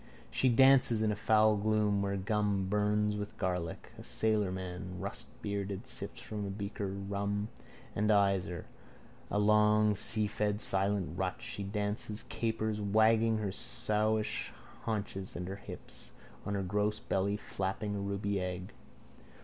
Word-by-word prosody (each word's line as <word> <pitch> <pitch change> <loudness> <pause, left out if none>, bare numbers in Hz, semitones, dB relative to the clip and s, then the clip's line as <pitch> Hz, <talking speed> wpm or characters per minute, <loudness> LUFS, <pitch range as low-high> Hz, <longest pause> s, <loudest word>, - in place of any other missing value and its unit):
She 130 - +3
dances 125 -2 +6
in 110 - +2
a - - 0
foul 110 0 +4
gloom 105 -1 +2
where 100 0 0
gum 100 -1 +1
bums 105 +1 +1
with 105 +2 -5
garlic. 90 -5 -3
A - - -8
sailorman, 95 -4 -1
rustbearded, 100 0 -4
sips - - -5
from 105 -1 -5
a 100 - -3
beaker 100 +1 -4
rum 100 +2 -2 0.5
and 105 +1 +1
eyes 100 -3 +4
her. 85 -2 -6 0.6
A - - 0
long 105 +1 +5
and 105 - +2
seafed 105 -1 +1
silent 95 -3 +1
rut. 95 -1 -1
She - - -5
dances, 105 +2 -2
capers, 110 -2 -1
wagging 110 +2 +4
her 105 -3 -2
sowish 110 +2 0 0.3
haunches 100 -3 -2
and 90 0 -4
her 95 +1 -5
hips, - - -8 0.3
on 100 - -1
her 100 - -1
gross 105 +3 0
belly 100 -2 0
flapping 100 +1 -3
a - - -2
ruby 100 0 -1
egg. 90 0 -4
105 Hz, 140 wpm, -33 LUFS, 100-105 Hz, 0.6 s, dances